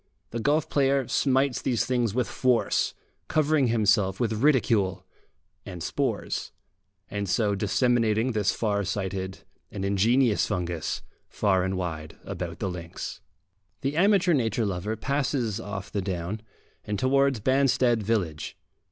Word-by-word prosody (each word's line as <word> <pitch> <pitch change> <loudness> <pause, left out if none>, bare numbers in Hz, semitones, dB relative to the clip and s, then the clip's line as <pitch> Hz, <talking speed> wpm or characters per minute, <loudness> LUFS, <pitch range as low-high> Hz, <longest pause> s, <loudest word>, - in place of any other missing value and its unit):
The 115 - -3
golf 145 +6 +2
player 135 -2 +2
smites 135 -1 +2
these 120 -3 +1
things 120 -4 0
with 125 -3 +1
force, 125 +1 +1 0.3
covering 155 -3 +2
himself 105 -4 +2
with 110 -2 0
ridicule 115 -9 +2 0.6
and 90 -3 -7
spores, - - -2 0.6
and 100 -2 -3
so 105 +2 +2
disseminating 115 +3 +2
this 105 -4 +1
far 100 -2 0
sighted 95 -1 -3 0.3
and 100 -1 -4
ingenious 110 +4 +3
fungus 85 -3 -2 0.3
far 95 -3 +2
and 95 0 -1
wide 80 -4 -5
about - - -5
the - - -2
links. 85 -2 -6 0.6
The 140 +1 -1
amateur 190 0 +4
nature 115 -4 +1
lover 100 +2 -2
passes 130 -3 -1
off 100 -1 -6
the 100 - -1
down, 95 +2 -3 0.4
and 105 -1 -3
towards 135 +1 +2
Banstead 130 -1 +3
village. 95 -8 -2
110 Hz, 130 wpm, -26 LUFS, 95-130 Hz, 0.6 s, amateur